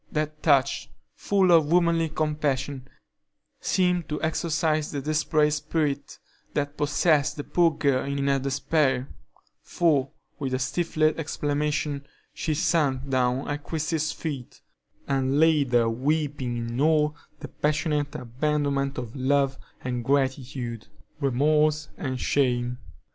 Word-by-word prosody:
That 155 0 -2
touch, 140 -3 +2 0.2
full 195 -3 +2
of 160 -3 +5
womanly 170 -2 +3
compassion, 145 -4 -2 0.7
seemed 180 -3 +1
to 150 - -2
exorcise 155 -1 0
the 145 - -3
desperate 150 +1 +1
spirit 145 -2 -2 0.4
that 145 0 -1
possessed 150 0 +2
the 145 - -4
poor 170 +2 +3
girl 135 -3 +1
in 140 0 -2
her 140 0 +2
despair, 135 0 0 0.5
for, 145 -6 +1 0.3
with 135 -3 -1
a - - +1
stifled 155 +3 0
exclamation, 145 -2 -2 0.3
she 155 -2 -2
sunk 140 -4 +1
down 130 0 +1
at 145 0 -3
Christie's 155 -1 -1
feet, 140 -7 -6 0.5
and 135 0 +1
lay 160 -2 +5
there 120 -3 +2
weeping 135 0 -1
in 115 +2 -3
all 150 -1 +3 0.2
the - - -7
passionate 150 -1 -1
abandonment 140 +2 -1
of 120 0 -6
love 135 0 +1 0.2
and 125 -1 -2
gratitude, 130 -3 -1 0.3
remorse 150 +3 +2
and 130 -3 -4
shame. 125 -3 0
145 Hz, 120 wpm, -26 LUFS, 135-155 Hz, 0.7 s, of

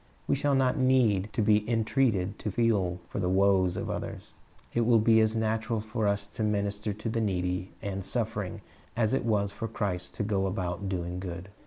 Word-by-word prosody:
We - - +1
shall 140 0 +1
not 130 +1 +2
need 115 -6 +3
to 110 - +1
be 105 +1 +3
entreated 110 -4 +1
to - - -3
feel 100 -5 +1
for - - -5
the 90 -2 0
woes 95 -1 +3
of - - -3
others. - - -6 0.4
It 120 - +2
will 115 0 +5
be 110 +1 +5
as 110 0 +2
natural 110 0 0
for 110 0 -2
us 100 0 0
to - - -6
minister 105 0 -1
to 105 +2 -6
the 115 0 0
needy 90 -2 -1
and 100 -1 -3
suffering 110 -3 -2 0.4
as 110 -1 +2
it 135 - 0
was 100 -3 +1
for 105 +3 -4
Christ 95 -5 -3
to - - -2
go 100 -2 0
about 95 0 -3
doing 90 -1 -3
good. 90 0 -6
105 Hz, 195 wpm, -29 LUFS, 95-115 Hz, 0.4 s, will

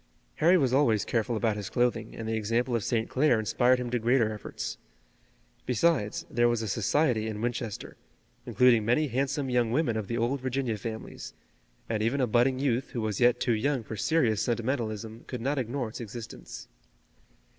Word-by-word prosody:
Harry 175 +4 +5
was 130 -6 +1
always 120 -7 +3
careful 115 0 0
about 110 0 +1
his 105 -2 -5
clothing, 120 -3 0
and 115 - -6
the 110 - -1
example 115 +3 0
of 115 - -1
St. 115 0 0
Clair 130 -4 +2
inspired 120 +4 +3
him 125 -1 -4
to 125 - +1
greater 115 -1 +2
efforts. 105 - -6 0.9
Besides, 125 -3 +1
there 120 0 +2
was 120 -1 0
a - - -3
society 115 +2 +1
in 105 -1 -4
Winchester, 120 -2 -4 0.5
including 125 -3 +4
many 130 +7 +2
handsome 135 +3 -1
young 120 -3 +1
women 125 -3 +1
of 110 -3 -3
the 115 - -2
old 120 +3 0
Virginia 130 -3 -1
families, 110 +1 -7 0.5
and 110 -2 -1
even 115 +6 +1
a 130 - +3
budding 125 +3 +2
youth 130 -1 0
who 120 - -2
was 105 -2 -2
yet 125 0 +4
too 120 - +1
young 130 +3 0
for 110 - -7
serious 110 -3 +1
sentimentalism, 115 -2 -2
could 125 - -5
not 135 +4 -1
ignore 125 0 -2
its 110 - -8
existence. 110 - -8
120 Hz, 180 wpm, -28 LUFS, 110-130 Hz, 0.9 s, Harry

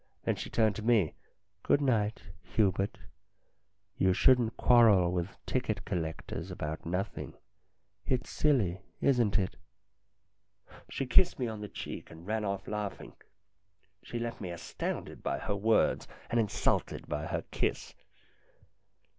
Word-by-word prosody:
Then - - +1
she - - -6
turned 110 -3 +2
to - - -4
me: 110 -7 +3 0.3
" - - -50
Good 140 - +3
night, 115 -6 +1 0.2
Hubert. 100 -2 +1 1.0
You 95 -1 +4
shouldn't 120 +1 +4
quarrel 110 -8 +6
with 90 +1 -3
ticket - - -1
collectors 80 +1 -4
about 80 -3 -5
nothing. 90 +3 -3 0.7
It's 125 -1 0
silly, 105 - +2 0.2
isn't 120 -7 +3
it?" 95 -3 -1 1.3
She 135 - -2
kissed 130 +8 +5
me 125 - -1
on 110 -2 -4
the 105 - -6
cheek, - - -7
and 80 +1 -12
ran 110 +2 -1
off 100 -1 -3
laughing. 105 -2 -4 0.9
She 120 - -6
left 115 0 -4
me 95 - -4
astounded 85 -1 -5
by 70 - -1
her 100 +8 -2
words 110 +2 +2 0.2
and 120 - +3
insulted 105 -3 0
by 75 +2 -3
her - - -2
kiss. - - -1
105 Hz, 135 wpm, -31 LUFS, 90-115 Hz, 1.3 s, quarrel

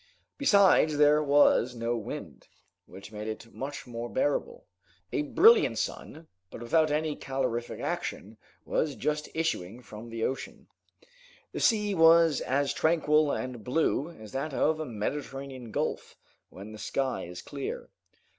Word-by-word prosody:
Besides 200 - +4
there 150 +1 +5
was 140 -4 +4
no 115 0 -1
wind, 110 -3 -7 0.4
which 95 +1 -12
made 105 0 -6
it 110 +1 -7
much 140 +1 -6
more 120 -1 -6
bearable. 475 - -1 0.5
A - - +1
brilliant 400 - +5
sun, 160 +1 -5 0.2
but - - -9
without 155 +7 +2
any 150 0 -1
calorific 120 -3 -3
action, - - -4 0.3
was 150 -3 -1
just 150 0 -2
issuing 125 - -2
from 110 +2 -10
the 115 0 -4
ocean. 130 - -4 0.9
The - - -5
sea 210 -3 +2
was 165 -3 +5
as 140 +2 0
tranquil 155 -2 +2
and 125 -4 -4
blue 150 +3 0
as 110 -11 -12
that 135 +1 -3
of 155 +1 +1
a 155 - -4
Mediterranean 135 +2 -5
gulf, - - -3 0.3
when 100 +3 -10
the 110 - -10
sky 130 -1 -2
is 90 +1 -9
clear. 140 -2 -6
140 Hz, 140 wpm, -28 LUFS, 115-155 Hz, 0.9 s, there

